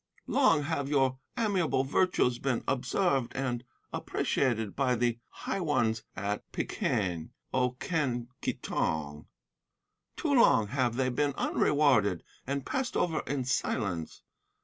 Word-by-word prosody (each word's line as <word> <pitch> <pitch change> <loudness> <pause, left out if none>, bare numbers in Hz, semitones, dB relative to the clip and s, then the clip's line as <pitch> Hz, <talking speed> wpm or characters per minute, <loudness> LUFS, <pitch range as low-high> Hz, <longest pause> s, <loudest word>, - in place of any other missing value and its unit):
Long 165 - +4
have 145 -2 -2
your 135 -3 +2 0.2
amiable 180 - +2
virtues 135 -4 +2
been 130 -4 0
observed 135 0 +1
and 125 -2 -2 0.3
appreciated 110 -6 0
by 130 -3 +2
the 120 0 0
high - - -4
ones 120 -9 +1
at 100 +2 -3
Peking, 85 -4 -1 0.2
O 125 -1 +2
Quen 130 -8 -1
Ki - - 0
Tong. 75 -1 -2 0.9
Too - - 0
long 105 -2 +5
have 125 -2 0
they 130 0 +1
been 140 +3 0
unrewarded 130 - +2 0.2
and 140 0 -2
passed 260 -2 -1
over 165 -3 +1
in 135 0 -1
silence. 100 -9 -2
130 Hz, 125 wpm, -30 LUFS, 115-145 Hz, 0.9 s, long